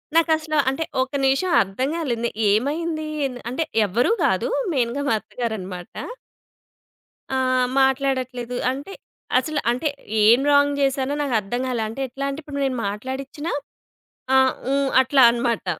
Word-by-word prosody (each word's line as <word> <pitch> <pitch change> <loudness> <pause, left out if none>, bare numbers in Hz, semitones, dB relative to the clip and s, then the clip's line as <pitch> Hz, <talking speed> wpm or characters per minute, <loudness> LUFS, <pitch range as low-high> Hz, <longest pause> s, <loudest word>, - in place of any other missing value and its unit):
నాకసలు 315 -2 +2
అంటే 270 +5 -2 0.2
ఒక 260 0 -2
నిమిషం 270 +8 +2
అర్థం 195 +8 -2
కాలేదు 255 -9 -2
నే - - +1 0.2
ఏమైంది 310 +8 0 0.2
ఏం 265 - -3 0.2
అంటే 290 +6 -1 0.2
ఎవరు 235 - +1
కాదు. - - +1 0.2
మెయిన్‌గా 250 0 0
మా - - +3
అత్తగారన్నమాట. 195 -7 -5 1.5
ఆ! 265 - +1 0.4
మాట్లాడట్లేదు, 260 -2 0 0.2
అంటే 285 +9 -7 0.5
అసలు 295 +3 -2
అంటే 255 +6 -1 0.4
ఏం 230 +4 +7
రాంగ్ 285 0 +4
చేశానో 270 0 +1
నాకర్థం 240 -3 -1
కాలే. 240 -3 -1
అంటే 225 +5 -6
ఎట్లా 270 +2 -5
అంటే 275 +2 -4
ఇప్పుడు 280 -1 -6
నేను 255 -2 -1
మాట్లాడిచ్చినా, 265 +9 -5 0.8
"ఆ! - - +7 0.4
ఊ!" - - +3 0.3
అట్లా 265 +1 +3
అనమాట. 235 -3 -1
265 Hz, 135 wpm, -22 LUFS, 235-285 Hz, 1.5 s, ఏం